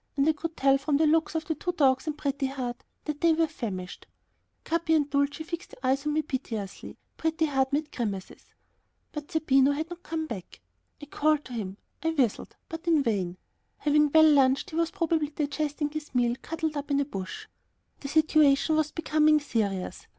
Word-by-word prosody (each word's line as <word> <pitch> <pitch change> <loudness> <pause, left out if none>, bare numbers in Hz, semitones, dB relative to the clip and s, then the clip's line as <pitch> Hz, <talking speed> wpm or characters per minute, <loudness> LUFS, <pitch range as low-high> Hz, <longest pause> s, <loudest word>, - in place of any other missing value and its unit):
And 275 +2 +3
I - - +6
could 325 +2 -6
tell 275 0 +4
from 280 +1 +1
the 315 - +3
looks 320 +1 +2
of 320 -1 -1
the 320 - -1
two 355 +3 -3
dogs 270 -2 +2
and 305 -1 -2
Pretty 280 -1 -1
Heart 255 -3 -5 0.2
that 300 -1 -4
they 335 -1 +5
were 325 +1 +3
famished. 200 - -6 0.6
Capi 325 0 +1
and 295 -2 +2
Dulcie 285 +2 0
fixed 340 +3 -7
their 255 0 0
eyes 275 +2 -1
on 300 - +1
me 310 +1 +1
piteously; 230 -9 -5 0.2
Pretty 320 0 +1
Heart 270 -3 +1
made 295 +1 -1
grimaces. 200 -6 -4 0.7
But 295 -1 -7
still 320 - 0
Zerbino 275 -1 +4
had 315 +3 -4
not 350 0 -7
come 320 -2 -3
back. 205 - -8 0.4
I 295 - -9
called 300 +1 +1
to 250 - -9
him, 200 -4 -4 0.2
I 325 - +1
whistled, 270 -9 0
but 325 +1 -8
in 320 -4 +4
vain. 190 -6 -1 0.4
Having 300 0 +3
well 315 +1 +7
lunched 275 -3 +4
he - - -6
was 335 0 +1
probably 325 -3 0
digesting 295 0 -2
his 305 -3 -7
meal, 240 -1 +2
cuddled 320 -1 -3
up 285 0 -4
in 280 0 +2
a 285 - +1
bush. 195 -9 -6 0.5
The 280 - -6
situation 310 0 +4
was 310 -1 +1
becoming 310 -1 +3
serious. 205 -9 -2
295 Hz, 195 wpm, -28 LUFS, 265-315 Hz, 0.7 s, well